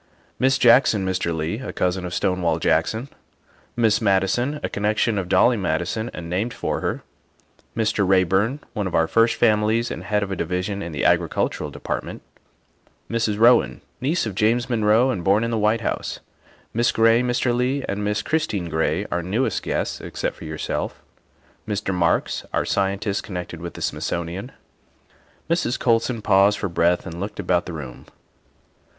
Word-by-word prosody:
" - - -36
Miss 130 +1 +3
Jackson, 120 -5 +5
Mr. 95 -2 -1
Leigh 80 +6 -2
(a 130 - -5
cousin 90 0 -1
of 90 - -5
Stonewall 85 -3 +1
Jackson); 110 - 0 0.7
Miss 115 -1 +2
Madison 110 +8 +1
(a - - 0
connection 105 +1 0
of 90 -2 -5
Dolly 120 +4 +4
Madison 90 +5 -1
and 85 - -7
named 100 +8 -2
for - - -2
her); - - -2 0.7
Mr. 110 -2 +1
Reyburn 95 - +2
(one 105 -4 -2
of 95 - -3
our 80 - +4
first 115 +4 +3
families 110 +1 +2
and - - -6
head 105 -1 +1
of 100 - -5
a - - -1
division 90 +4 -2
in 85 - -5
the 75 -3 -2
Agricultural - - +1
De - - -11
partment); - - -4 0.9
Mrs. 115 -3 0
Rowen 120 +2 +4 0.2
(niece 150 +5 0
of 110 - -4
James 115 +6 +1
Monroe 115 +3 +3
and 90 -6 -3
born 100 +4 +3
in 115 - -1
the 115 - 0
White 105 +2 +2
House); - - -3 0.5
Miss 120 +1 +2
Gray, 115 +1 +4
Mr. 125 0 0
Leigh, 130 +3 0
and 100 +1 -2
Miss 105 +1 -1
Christine 105 - -1
Gray 80 +4 0
(our 85 - 0
newest 105 +10 -1
guests - - -2
except - - -4
your 80 0 -6
self); - - -4 0.6
Mr. 105 -2 -2
Marks 85 -2 +1
(our - - 0
Scientist 100 +1 0
connected 90 -3 -6
with 85 0 -7
the - - -6
Smithsonian)." 90 +8 -3 1.0
Mrs. 165 -6 0
Colson 115 -1 +1
paused 100 0 +4
for 100 - -3
breath 85 +1 +1
and 85 -1 -7
looked 100 +2 -5
about 90 -2 0
the 90 - -5
room. 65 -6 -8
105 Hz, 170 wpm, -22 LUFS, 90-115 Hz, 1.0 s, Jackson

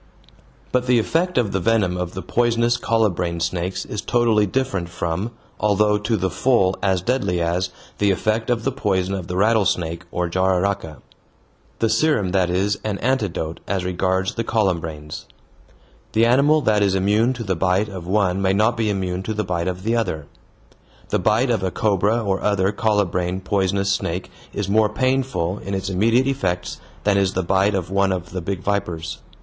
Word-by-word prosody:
But 125 0 0
the 125 -1 +4
effect 170 +10 0
of 115 -5 +2
the 95 - 0
venom 95 -2 +1
of 90 0 -4
the 95 - -5
poisonous 120 0 +2
colubrine 90 -8 0
snakes 90 +2 -2
is 105 - -4
totally 115 -3 +2
different 110 -7 -1
from, 85 +4 -3 0.3
although 105 0 +2
to 105 +2 0
the 95 0 -1
full 95 -8 +2
as 95 -2 +1
deadly 125 -7 0
as, 85 +2 0 0.3
the 105 - +3
effect 110 +4 0
of 120 -2 0
the 135 - 0
poison 95 -6 -1
of 95 -3 -4
the 90 - -3
rattlesnake 95 -5 +1
or 90 0 -1
jararaca. 95 -2 0 0.8
The 115 - +1
serum 110 -4 +2
that 90 -2 +2
is 95 +3 0
an 105 -2 -2
antidote 100 -11 -1
as 95 -3 -1
regards 95 +1 0
the 115 - -2
colubrines. 85 -9 -2 0.9
The 115 +1 +4
animal 140 +6 +4
that 105 -5 +2
is 100 -2 +2
immune 105 +6 +2
to 120 -2 -6
the 95 -3 -1
bite 95 +4 +1
of 95 -4 -8
one 95 -1 +1
may 95 0 +2
not 110 +4 +2
be 110 -2 0
immune 95 -2 -2
to 110 +3 -4
the 105 - -1
bite 90 -2 -2
of 90 0 -3
the 115 +2 +1
other. 80 -10 -1 0.8
The - - +1
bite 115 +4 +2
of 115 - +1
a 95 - 0
cobra 105 +4 +1
or 95 -2 -1
other 100 -1 +1
colubrine 95 -4 0
poisonous 100 0 0
snake 90 0 -2 0.2
is 100 -2 -3
more 105 +1 +3
painful 130 -6 0
in 100 +1 -4
its 95 0 -3
immediate 115 +7 +3
effects 95 -10 -2 0.2
than 100 -1 +3
is 95 -1 +1
the 95 - -1
bite 95 +3 +2
of 90 -2 -3
one 100 0 +2
of 90 -1 -4
the 90 0 -4
big 90 +1 -3
vipers. 90 -5 -2
100 Hz, 180 wpm, -21 LUFS, 90-110 Hz, 0.9 s, the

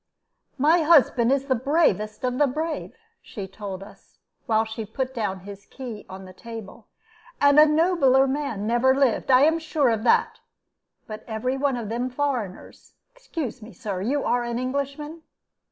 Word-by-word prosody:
"My 315 +5 +4
husband 270 -6 +4
is 275 0 +1
the 270 - +1
bravest 255 - 0
of 250 0 -1
the 290 - +4
brave," 310 - -4 0.3
she 200 -4 -8
told 195 -1 -7
us, 200 - -17 0.3
while 220 0 +2
she 220 0 -6
put 255 +5 -4
down 200 -6 -3
his 200 +1 -11
key 240 -6 -8
on 190 0 -9
the 185 - -12
table; 225 0 -10 0.5
"and 285 +1 +6
a 305 - +8
nobler 300 -4 +3
man 270 -7 -2
never 240 +4 +3
lived; 270 -4 +1
I 255 0 +6
am 320 +2 +3
sure 310 -4 +1
of 220 -1 -1
that. 240 - +2 0.7
But 215 -1 -8
every 240 +3 -2
one 270 -1 0
of 225 -4 -5
them 240 +3 -2
foreigners 250 -8 -4 0.2
excuse 325 - -6
me, 215 0 -11
Sir, 185 +1 -5
you 270 +8 -1
are 245 0 +1
an 235 0 -3
Englishman?" 280 +5 -4
255 Hz, 170 wpm, -24 LUFS, 220-285 Hz, 0.7 s, a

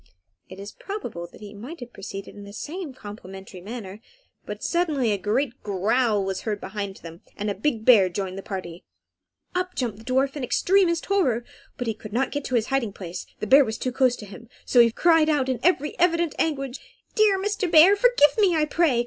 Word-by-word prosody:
It 190 - -10
is 200 +1 -8
probable 240 - -6
that 175 - -17
he 210 -1 -9
might 250 +12 -9
have 245 -1 -10
proceeded 195 0 -8
in 205 - -11
the 200 0 -11
same 320 - -6
complimentary 195 -5 -10
manner, 210 -1 -8 0.5
but - - -6
suddenly 305 -9 +1
a 205 - +1
great 240 +6 -1
growl 210 +1 +1
was 190 -1 -3
heard 210 -2 -3
near 190 - -8
by 200 -2 -3
them, 165 +1 -10 0.2
and 205 0 -2
a - - -1
big 220 +1 -2
bear 205 -7 +7
joined 185 +1 -4
the 195 - -6
party. 180 -4 -7 0.7
Up 365 0 -2
jumped 230 -5 -2
the - - -13
dwarf 265 +3 +1
in 285 - -4
extremest 350 +5 +2
terror, 260 - +1 0.3
but 225 -3 -3
could 215 -1 -9
not 255 +3 0
get 290 -1 -3
to 255 - -2
his 225 -2 +1
hiding 235 -7 0
place, 180 -2 -7
the - - -1
bear 275 +7 +7
was 220 -3 -4
too 255 - -2
close 255 -1 +2
to 210 - -10
him; 210 +4 -12 0.2
so 245 - +3
he 235 -1 +7
cried 325 +3 +4
out 290 -4 +1
in 260 -3 -1
very 300 -1 +1
evident 340 -2 +2
anguish 275 -4 -1 0.4
"Dear 425 -2 +4
Mr. 410 -1 -1
Bear, 345 +5 +8
forgive 480 -9 +4
me, 385 -5 +4
I 310 -1 +2
pray! 305 -5 +2
245 Hz, 210 wpm, -24 LUFS, 205-310 Hz, 0.7 s, Bear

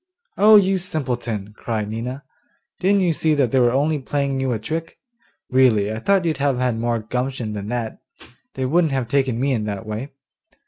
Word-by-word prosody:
'Oh, 215 +2 +7
you 195 -2 +4
simpleton!' 120 - -3
cried 110 -3 -3
Nina; 125 +6 -5 0.6
'didn't 200 +2 +3
you 175 -3 +2
see 155 0 +1
that 135 -5 +1
they 130 - +3
were 120 -1 +5
only 145 +4 +1
playing 140 0 -1
you 130 -1 0
a 115 - 0
trick? 160 +10 -5 0.5
Really, 110 -5 +3
I 110 - -4
thought 195 +7 +2
you'd 160 -3 0
have 140 -2 +1
had 125 -3 0
more 120 0 0
gumption 125 0 -3
than 100 -1 -5
that; 115 -1 -3 0.6
they 130 - -2
wouldn't 160 +2 +2
have 130 -3 -1
taken 130 -2 +1
me 140 +2 +1
in 130 - +2
in 105 - -3
that 105 +1 -4
way. 110 +6 -5
130 Hz, 195 wpm, -21 LUFS, 115-150 Hz, 0.6 s, Oh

